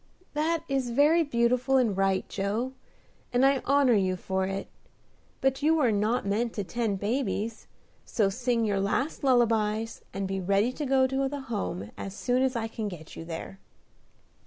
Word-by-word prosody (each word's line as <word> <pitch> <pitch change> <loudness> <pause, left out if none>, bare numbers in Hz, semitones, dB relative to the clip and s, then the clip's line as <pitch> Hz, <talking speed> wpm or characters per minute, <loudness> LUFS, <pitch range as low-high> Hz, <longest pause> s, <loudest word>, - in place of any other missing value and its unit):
"That 320 +2 0
is 270 -3 -1
very 295 +7 +4
beautiful 250 -1 +2
and 230 -6 +2
right, 195 -1 +1
Joe, 215 +6 -2 0.6
and 250 +2 +3
I 275 -1 +3
honor 280 -2 +4
you 190 -3 +2
for 190 +1 -2
it; 195 0 -4 0.7
but 270 0 +1
you 315 +2 +4
were 270 -8 +3
not 215 +4 +1
meant 225 +4 0
to 205 - -2
tend 205 +1 -2
babies, 225 0 -2 0.4
so 210 -4 +1
sing 235 +2 0
your 200 -2 +1
last 260 +11 -1
lullabies, 225 -4 +2
and 195 0 -3
be 195 0 -2
ready 200 +6 +2
to 290 +2 -4
go 265 0 +4
to 270 +1 0
the 285 0 -5
Home 95 - -4
as 195 0 -6
soon 250 +3 +1
as 260 -1 +1
I 225 -1 -1
can 220 -1 -4
get 165 -5 -9
you - - -7
there." 170 +3 -7
230 Hz, 175 wpm, -28 LUFS, 200-265 Hz, 0.7 s, very